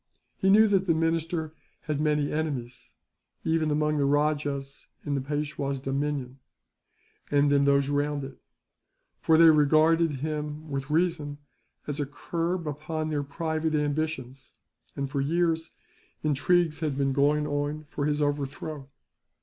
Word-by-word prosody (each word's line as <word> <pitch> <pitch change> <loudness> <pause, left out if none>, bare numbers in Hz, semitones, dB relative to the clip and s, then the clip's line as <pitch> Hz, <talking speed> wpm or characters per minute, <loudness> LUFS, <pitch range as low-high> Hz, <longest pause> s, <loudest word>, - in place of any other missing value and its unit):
He 190 - +2
knew 215 +3 +7
that 195 -2 +2
the 165 - +3
minister 165 0 -1 0.3
had 150 -1 -2
many 150 -1 +1
enemies, 135 -6 -4 0.5
even 160 -1 +1
among 150 0 +1
the 140 - +2
rajahs 145 -1 -1 0.2
in 145 - -1
the 140 - 0
Peishwa's 145 -1 -3
dominion, 135 -1 -3 0.9
and 145 0 +3
in 140 0 +4
those 140 -1 +3
round 145 0 0
it; 135 -1 -9 0.8
for 160 - +4
they 165 0 +8
regarded 155 +2 +4
him, 150 +2 -4
with 135 0 -3
reason, 155 -3 0 0.5
as 145 0 -3
a 145 - -1
curb 170 +4 -3
upon 155 +2 -3
their 150 -2 0
private 160 +2 -2
ambitions 145 -4 -2 0.4
and, 140 - -2
for 140 0 -2
years, 165 +2 0 0.5
intrigues 155 +2 +2
had 150 -4 -2
been 135 -1 +1
going 145 +2 +2
on 145 +1 -2
for 145 0 -2
his 150 0 +1
overthrow. 145 0 -3
150 Hz, 140 wpm, -27 LUFS, 140-160 Hz, 0.9 s, they